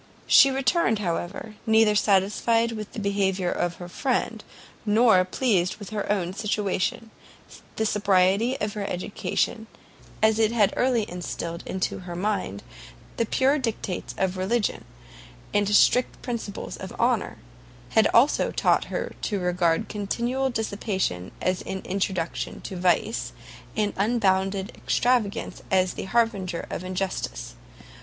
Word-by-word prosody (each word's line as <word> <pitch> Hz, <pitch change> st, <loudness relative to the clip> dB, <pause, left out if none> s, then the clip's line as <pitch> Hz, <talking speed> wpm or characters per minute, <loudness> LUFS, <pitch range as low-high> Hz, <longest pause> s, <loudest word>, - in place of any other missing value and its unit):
She 275 Hz, -, +7 dB
returned, 270 Hz, -2 st, +2 dB
however, 200 Hz, +3 st, -4 dB
neither 220 Hz, -1 st, +5 dB
satisfied 210 Hz, +3 st, +2 dB
with 215 Hz, -2 st, -6 dB
the -, -, -5 dB
behaviour 195 Hz, -3 st, 0 dB
of 175 Hz, -1 st, -1 dB
her 175 Hz, -, -8 dB
friend, 235 Hz, +1 st, -1 dB, 0.4 s
nor 215 Hz, -3 st, +5 dB
pleased 185 Hz, -2 st, +1 dB
with 205 Hz, -2 st, -9 dB
her 205 Hz, -1 st, -2 dB
own 185 Hz, -3 st, -1 dB
situation: 210 Hz, +1 st, -1 dB, 0.6 s
the 220 Hz, -, 0 dB
sobriety 205 Hz, +4 st, +2 dB
of 210 Hz, -1 st, -2 dB
her 210 Hz, -, -4 dB
education, 210 Hz, +4 st, -2 dB, 0.6 s
as 220 Hz, 0 st, +4 dB
it 220 Hz, -1 st, +3 dB
had 215 Hz, -4 st, +3 dB
early 245 Hz, -4 st, +1 dB
instilled 170 Hz, -1 st, -5 dB
into 190 Hz, 0 st, -2 dB
her 180 Hz, -2 st, -7 dB
mind 185 Hz, -, -2 dB, 0.5 s
the 230 Hz, -, 0 dB
pure 275 Hz, +5 st, +2 dB
dictates 225 Hz, -7 st, -3 dB
of 190 Hz, -1 st, 0 dB
religion, 205 Hz, +4 st, -1 dB, 0.7 s
and 205 Hz, -1 st, +2 dB
strict 245 Hz, +4 st, +4 dB
principles 235 Hz, -5 st, -5 dB
of -, -, -8 dB
honour, -, -, +1 dB, 0.5 s
had 220 Hz, -1 st, +4 dB
also 255 Hz, +6 st, +4 dB
taught -, -, +2 dB
her -, -, -4 dB
to 205 Hz, -3 st, -1 dB
regard 180 Hz, +2 st, +1 dB
continual 240 Hz, +6 st, -1 dB
dissipation 200 Hz, -, -2 dB
as 185 Hz, 0 st, 0 dB
an 190 Hz, 0 st, -5 dB
introduction 185 Hz, -3 st, -2 dB
to 190 Hz, -, -7 dB
vice, 180 Hz, +5 st, 0 dB, 0.4 s
and 210 Hz, -1 st, +1 dB
unbounded 195 Hz, -2 st, +1 dB
extravagance 240 Hz, -5 st, 0 dB
as 185 Hz, -1 st, +2 dB
the -, -, -5 dB
harbinger 200 Hz, -6 st, 0 dB
of -, -, -4 dB
injustice. 185 Hz, -, -3 dB
205 Hz, 130 wpm, -25 LUFS, 185-225 Hz, 0.7 s, She